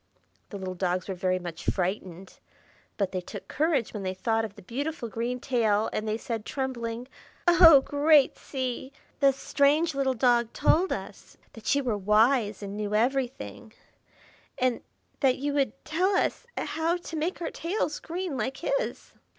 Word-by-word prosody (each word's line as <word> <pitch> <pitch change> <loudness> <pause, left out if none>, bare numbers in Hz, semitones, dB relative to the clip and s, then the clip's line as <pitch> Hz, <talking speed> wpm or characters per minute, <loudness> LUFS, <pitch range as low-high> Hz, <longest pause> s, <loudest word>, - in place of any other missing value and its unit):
The 205 - -6
little 185 -1 -4
dogs 180 0 -1
were 195 - -2
very 185 0 0
much 175 -3 -7
frightened, 185 -1 -3 0.6
but 200 -3 0
they 185 - -2
took - - -9
courage 300 -5 0
when 210 - -4
they 185 -1 -3
thought 225 +3 0
of 210 -2 -6
the - - -13
beautiful 270 - -4
green 235 +4 -3
tail, 225 -5 +1
and 215 - -2
they 215 +1 0
said, 225 -2 -4
trembling,— 240 -2 -4 0.4
"Oh, 335 -5 +9
great 290 +1 +4
Sea! 260 -1 -4 0.3
the 275 -1 +6
strange 290 +4 +2
little 270 -1 0
dog 240 -1 +2
told 330 +5 +3
us - - -6 0.2
that 225 +5 -1
you 280 - +1
were 225 -5 -1
wise 215 +1 +3
and 200 0 -5
knew 210 0 -2
everything, 245 -1 -1 0.8
and 250 -2 +1 0.4
that 265 -3 +3
you 285 +2 -2
would 280 -2 +1
tell 370 +5 +1
us - - 0
how 330 +2 0
to 345 -2 -8
make 320 +4 -2
our 345 - -3
tails 335 -3 -2
green 345 -2 -4
like 265 +1 -2
his." - - -2
250 Hz, 165 wpm, -27 LUFS, 210-290 Hz, 0.8 s, Oh